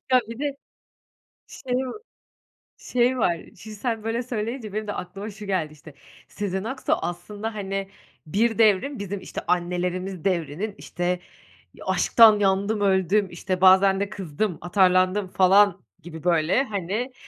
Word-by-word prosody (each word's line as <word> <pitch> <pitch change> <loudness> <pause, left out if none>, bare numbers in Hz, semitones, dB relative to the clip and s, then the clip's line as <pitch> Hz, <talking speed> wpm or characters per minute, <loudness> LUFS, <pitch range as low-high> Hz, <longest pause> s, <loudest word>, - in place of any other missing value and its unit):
Ya, 255 - +7
bir 230 - -7
de 285 -1 -2 0.9
şey 250 -2 -4
va - - -5 0.9
şey 250 +1 +1
var. 175 -6 +2 0.2
Şimdi, 215 +2 -10
sen 225 -1 -3
böyle 230 +2 -1
söyleyince, 230 -2 -4
benim 215 0 -3
de 205 - -3
aklıma 200 +4 -6
şu 205 0 -10
geldi, 170 -6 -1
işte. 150 0 -14 0.3
Sezen 195 -1 -3
Aksu 260 +3 -3
aslında, 205 +5 -3
hani, 195 -1 -3 0.4
bir 225 +6 +1
devrin 225 +5 +3
bizim, 200 -1 -4
işte, - - -6
annelerimiz 180 0 -1
devrinin, 180 +3 -1
işte, 175 0 -2 0.5
"Ya, - - -12
aşktan 220 -3 +6
yandım, 200 +2 +1
öldüm, 195 0 +2
işte, 180 +1 -3
bazen 190 +1 +6
de 200 - -1
kızdım, 185 0 -3
atarlandım." 185 +2 +2
falan 195 0 +4 0.2
gibi, 160 -1 -10
böyle, 170 +7 +3
hani, 215 +4 -3
195 Hz, 140 wpm, -24 LUFS, 180-220 Hz, 0.9 s, Ya